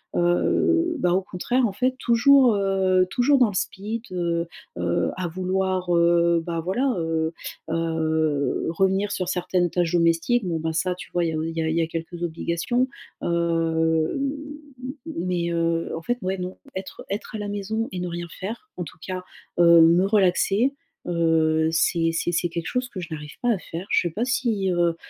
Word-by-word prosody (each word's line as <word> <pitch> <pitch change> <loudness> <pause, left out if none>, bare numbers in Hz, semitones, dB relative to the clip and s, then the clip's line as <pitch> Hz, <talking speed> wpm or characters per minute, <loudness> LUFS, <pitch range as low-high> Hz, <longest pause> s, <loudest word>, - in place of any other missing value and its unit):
heu, 335 - +2
ben 175 - +2
au 190 - +2
contraire 240 +7 0
en 195 - -5
fait 255 +5 0
toujours, 245 0 +5
heu, 190 -2 +2
toujours 265 +5 +3
dans 240 -4 +5
le 200 - -7
speed, 215 +5 -3
heu, 170 -2 -1 0.3
heu, 85 0 +1
à 185 - -2
vouloir, 185 +1 -1
heu, 170 0 +4
bah, 170 -1 -2
voilà, 245 +10 0
heu, 160 0 -1 0.4
heu, 160 -3 0
revenir 190 +4 +1
sur 185 -2 -2
certaines 180 -1 0
tâches 175 -2 0
domestiques. 170 +7 +2
Bon, 170 -3 -1
ben, 160 0 -2
ça 180 +3 0
tu - - -11
vois, 175 -1 +1
il - - 0
y - - -3
a - - -1
au 155 - -1
il 165 - -3
y - - +1
a 160 - 0
il 160 - 0
y 170 - +2
a 165 - 0
quelques 165 +1 -6
obligations, 170 +9 -1 0.4
heu, 165 -1 +1
m 275 -1 -1 0.5
m 260 - -4
m 185 - -4
mais, 175 -1 0
heu. 165 0 0
En - - -6
fait 245 +7 -1
ouais 190 0 -2
non, 180 0 -5 0.2
être 190 0 -7
être 205 +2 -4
à - - -3
la 205 - -4
maison 210 +3 -2
et 185 - -4
ne 180 - -3
rien 175 0 -5
faire 230 - -6
en 180 - -2
tout 155 - -12
cas, 185 -1 -4 0.4
heu, 170 -1 +8
me 170 +3 +5
relaxer, 200 +5 +2 0.3
heu, 160 -2 +2
c'est 165 0 +2
c'est 170 - 0
c'est 175 +1 +1
quelque 170 0 -4
chose 250 0 -2
que 195 - -7
je 175 - -6
n'arrive 150 -1 -7
pas 245 - +1
à 210 - 0
faire. 175 +2 -7
Je - - +4
sais - - -4
pas 230 +4 -1
si, 230 -6 0
heu, 175 -1 +2
180 Hz, 205 wpm, -24 LUFS, 165-200 Hz, 0.5 s, heu